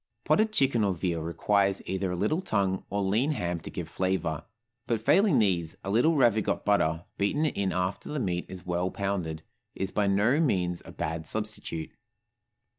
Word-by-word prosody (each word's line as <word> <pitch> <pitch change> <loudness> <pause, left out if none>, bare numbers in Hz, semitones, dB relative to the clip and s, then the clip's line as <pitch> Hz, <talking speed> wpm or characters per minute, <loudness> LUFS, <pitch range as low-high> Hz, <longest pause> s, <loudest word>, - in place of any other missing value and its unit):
Potted 215 0 +3
chicken 135 - +2
or 100 -2 +1
veal 85 -1 -1
requires 100 +4 +1
either 95 0 -2
a 90 - -2
little 105 - 0
tongue 95 - 0
or 100 0 -1
lean 115 +11 +2
ham 90 - -2
to - - -8
give - - -5
flavor; 95 -5 -1 0.4
but 115 -2 +1
failing 185 - +4
these, 90 -7 +1
a 100 - -3
little 140 +10 +4
ravigotte 115 -6 +2
butter, 85 -4 +2
beaten 145 +10 +1
in 100 -10 0
after 90 +2 -2
the 150 - -2
meat 90 -7 -2
is 95 0 -9
well 90 +1 0
pounded, 90 -6 -3 0.3
is 95 - -3
by 105 -1 +1
no 105 +9 +3
means 90 - +1
a - - -9
bad 80 0 -4
substitute. 105 -7 -4
100 Hz, 175 wpm, -28 LUFS, 90-110 Hz, 0.4 s, failing